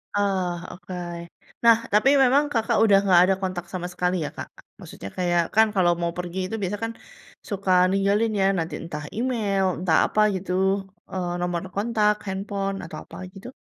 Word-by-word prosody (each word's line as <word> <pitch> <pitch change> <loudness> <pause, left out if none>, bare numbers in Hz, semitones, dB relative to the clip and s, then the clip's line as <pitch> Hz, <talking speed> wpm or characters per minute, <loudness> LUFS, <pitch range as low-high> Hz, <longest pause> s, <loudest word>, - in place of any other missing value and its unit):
Oh, 190 -3 0 0.2
oke. 180 +1 -10 0.7
Nah, 230 -1 +7 0.2
tapi 215 +6 +5
memang 270 +4 +4
Kakak 225 -2 +1
udah 200 -3 +6
nggak 180 -2 +6
ada 195 - +3
kontak 185 -2 -3
sama 180 -1 -3
sekali, 180 0 -1
ya, - - -3
Kak? - - -5 0.3
Maksudnya 100 - -9
kayak, 175 -1 +2
kan, 220 0 +6
kalau 175 -2 +4
mau 170 0 -1
pergi 180 +1 -4
itu 225 - -4
biasa, 195 +2 -2
kan, 225 - -2 0.6
suka 195 -2 -2 0.2
ninggalin, 200 +3 +2
ya, - - +3
nanti, 165 0 -3
entah 150 -3 -6
email, 215 -6 0
entah 175 -3 +2
apa, 215 - +1
gitu, 185 0 -5 0.6
eee, 180 -2 -3
nomor 175 -1 -1
kontak, 210 0 +2
handphone, 195 0 -3
atau 165 - -8
apa, - - -12 0.2
gitu? 195 +4 -11
190 Hz, 170 wpm, -24 LUFS, 180-210 Hz, 0.7 s, Nah